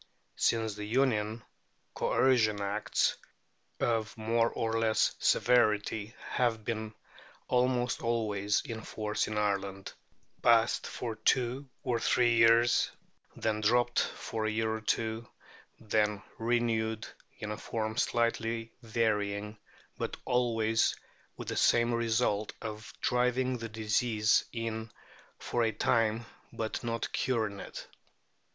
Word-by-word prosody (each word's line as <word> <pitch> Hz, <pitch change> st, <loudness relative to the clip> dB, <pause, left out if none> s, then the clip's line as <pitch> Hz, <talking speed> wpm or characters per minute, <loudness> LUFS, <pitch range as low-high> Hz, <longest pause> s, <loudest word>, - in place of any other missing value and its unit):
Since 110 Hz, -2 st, +1 dB
the 105 Hz, +1 st, -7 dB
Union, 110 Hz, -2 st, +1 dB, 0.5 s
Coercion 110 Hz, -6 st, +2 dB
Acts, 100 Hz, +1 st, 0 dB, 0.6 s
of 115 Hz, -1 st, 0 dB
more 115 Hz, +1 st, +2 dB
or 115 Hz, 0 st, -1 dB
less 110 Hz, -1 st, +2 dB
severity, 110 Hz, -2 st, +2 dB, 0.2 s
have 115 Hz, -4 st, 0 dB
been 110 Hz, -1 st, -3 dB, 0.5 s
almost 125 Hz, -1 st, +1 dB
always 105 Hz, -4 st, 0 dB
in 115 Hz, -1 st, -5 dB
force 105 Hz, -1 st, -2 dB
in 105 Hz, -, -3 dB
Ireland, 100 Hz, -2 st, -1 dB, 0.5 s
passed 115 Hz, -1 st, +4 dB
for 115 Hz, -3 st, -5 dB
two 130 Hz, +4 st, +1 dB
or 120 Hz, -2 st, 0 dB
three 120 Hz, 0 st, +3 dB
years, 115 Hz, +1 st, +5 dB, 0.5 s
then 110 Hz, -1 st, -1 dB
dropped 120 Hz, +3 st, +3 dB
for 110 Hz, -1 st, -2 dB
a -, -, +1 dB
year 110 Hz, 0 st, 0 dB
or 110 Hz, -, -4 dB
two, 110 Hz, +1 st, -1 dB, 0.5 s
then 105 Hz, -2 st, 0 dB, 0.2 s
renewed 115 Hz, -1 st, 0 dB, 0.3 s
in 105 Hz, -3 st, -5 dB
a 105 Hz, -, -4 dB
form 110 Hz, -1 st, -3 dB
slightly 115 Hz, -1 st, 0 dB
varying, 105 Hz, -2 st, -1 dB, 0.4 s
but -, -, -3 dB
always 115 Hz, -2 st, +2 dB, 0.4 s
with -, -, -7 dB
the -, -, -3 dB
same 120 Hz, 0 st, +4 dB
result 110 Hz, -2 st, +1 dB
of 105 Hz, 0 st, -7 dB
driving 125 Hz, +1 st, +1 dB
the 115 Hz, 0 st, -5 dB
disease 110 Hz, 0 st, +2 dB
in 115 Hz, -1 st, -4 dB, 0.5 s
for 120 Hz, -, -2 dB
a 115 Hz, -1 st, +2 dB
time, 115 Hz, +1 st, +1 dB, 0.3 s
but 110 Hz, -1 st, -4 dB
not 115 Hz, -1 st, -3 dB
curing 110 Hz, -6 st, 0 dB
it. -, -, -8 dB
115 Hz, 120 wpm, -31 LUFS, 110-120 Hz, 0.6 s, years